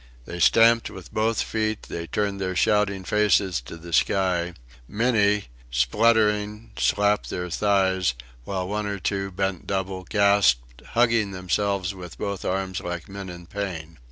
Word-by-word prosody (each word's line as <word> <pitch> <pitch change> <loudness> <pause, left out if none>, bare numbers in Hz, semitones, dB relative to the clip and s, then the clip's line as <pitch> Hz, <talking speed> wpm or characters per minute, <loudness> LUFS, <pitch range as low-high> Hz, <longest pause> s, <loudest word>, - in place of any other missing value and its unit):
They 85 - -7
stamped 115 +5 +5
with 95 -4 -11
both 110 +1 +1
feet; 110 -1 -2
they 85 0 -6
turned 100 0 -2
their 95 -1 -2
shouting 100 0 +2
faces 100 - +2
to 65 +7 -10
the 85 0 -10
sky; 90 -2 +1 0.3
many, 105 -3 +2 0.3
spluttering, 105 - +2
slapped 105 0 +1
their 90 -1 -4
thighs; 95 -6 +2 0.3
while 95 +4 -3
one 105 +1 -2
or 100 0 -2
two, 95 +1 -2
bent 95 -1 -3
double, 95 -1 -2
gasped, 95 - +2
hugging 115 -4 +2
themselves 95 +1 -1
with 90 -3 -10
both 100 -2 -4
arms 95 0 -2
like 90 -2 -5
men 100 -1 -7
in 85 -1 -9
pain. 85 -4 -6
95 Hz, 145 wpm, -24 LUFS, 90-105 Hz, 0.3 s, stamped